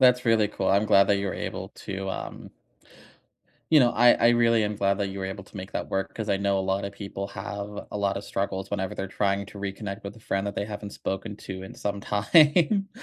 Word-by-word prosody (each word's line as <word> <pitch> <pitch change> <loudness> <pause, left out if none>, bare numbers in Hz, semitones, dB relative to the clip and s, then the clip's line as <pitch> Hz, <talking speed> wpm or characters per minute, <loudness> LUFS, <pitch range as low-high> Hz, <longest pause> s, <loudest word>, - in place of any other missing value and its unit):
That's 125 -1 +5
really 110 -2 +4
cool, 95 -2 -2
I'm 100 +2 +4
glad 100 -1 +6
that 100 - +4
you're 100 -1 -2
able - - -5
to, 95 0 -6
um - - -6 1.2
You 155 -3 +7
know, 120 -1 +5
I 120 +1 +7
I 115 - +4
really 115 -2 +4
am 105 0 -2
glad 100 -1 +2
that 100 -1 0
you 100 - -6
were 95 - -2
able 95 0 -6
to 100 - -14
make 95 +1 -7
that - - -3
work 95 0 -2
'cause 110 -2 -3
I 95 - +2
know 100 -1 +1
a - - +1
lot 100 +1 0
of 100 - -7
people 100 -1 -5
have 100 +1 -5 0.2
a 105 - -4
lot 100 -1 0
of 100 - -5
struggles 95 0 -3
whenever 95 -2 -2
they're 95 - -3
trying 100 0 0
to 100 - -11
reconnect 100 +1 -5
with 100 +2 -7
a - - -15
friend 95 -1 -1
that 100 - -3
they 100 - -1
haven't 105 -1 -6
spoken 100 +2 -4
to 95 -2 -7
in 95 - -9
some 100 -1 -3
time. 155 - +4
100 Hz, 245 wpm, -26 LUFS, 100-110 Hz, 1.2 s, You